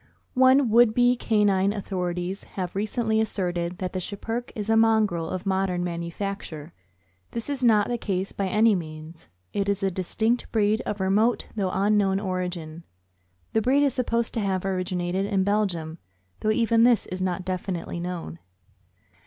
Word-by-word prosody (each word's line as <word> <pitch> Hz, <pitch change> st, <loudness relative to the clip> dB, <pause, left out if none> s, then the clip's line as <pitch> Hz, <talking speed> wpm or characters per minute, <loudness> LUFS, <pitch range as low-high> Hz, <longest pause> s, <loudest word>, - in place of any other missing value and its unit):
OME 260 Hz, -1 st, +5 dB
would 230 Hz, -1 st, +5 dB
be 245 Hz, 0 st, +4 dB
canine 205 Hz, -4 st, +2 dB
authorities 180 Hz, -2 st, -3 dB
have 180 Hz, -2 st, -4 dB
recently 220 Hz, +2 st, 0 dB
as 220 Hz, -, -1 dB
serted 175 Hz, -2 st, -2 dB
that 185 Hz, -1 st, -4 dB
the 185 Hz, -, -2 dB
Schipperke 225 Hz, +6 st, -4 dB
is 210 Hz, -1 st, -4 dB
a 225 Hz, -, +3 dB
mongrel 220 Hz, -7 st, +3 dB
of 185 Hz, +1 st, -4 dB
modern 190 Hz, -2 st, 0 dB
manufacture. 170 Hz, -2 st, -5 dB, 0.6 s
This 235 Hz, +5 st, -3 dB
is 270 Hz, -2 st, -3 dB
not 215 Hz, -4 st, +4 dB
the 240 Hz, -1 st, -2 dB
case 190 Hz, -2 st, -2 dB
by 195 Hz, -, -2 dB
any 215 Hz, +3 st, +4 dB
means. 160 Hz, -2 st, -7 dB, 0.3 s
It 200 Hz, 0 st, 0 dB
is 200 Hz, 0 st, -1 dB
a 195 Hz, -, +1 dB
distinct 220 Hz, +6 st, -1 dB
breed, 215 Hz, -1 st, +2 dB
of 205 Hz, -2 st, -3 dB
remote 210 Hz, +5 st, +2 dB
though 195 Hz, -4 st, 0 dB
unknown 195 Hz, 0 st, +2 dB
origin. 180 Hz, -4 st, -4 dB, 0.7 s
The 220 Hz, -, +3 dB
breed 270 Hz, +5 st, +3 dB
is 280 Hz, -, +2 dB
supposed 235 Hz, -2 st, 0 dB
to -, -, 0 dB
have 195 Hz, -3 st, -1 dB
originated 185 Hz, 0 st, -1 dB
in 195 Hz, -2 st, +1 dB
Belgium, 180 Hz, -6 st, -1 dB, 0.4 s
though 215 Hz, -, -1 dB
even 230 Hz, +1 st, +3 dB
this 240 Hz, -2 st, +4 dB
is 185 Hz, +1 st, -5 dB
not 185 Hz, 0 st, -2 dB
definitely 185 Hz, -2 st, -3 dB
known. 170 Hz, -, -5 dB
195 Hz, 160 wpm, -25 LUFS, 180-220 Hz, 0.7 s, OME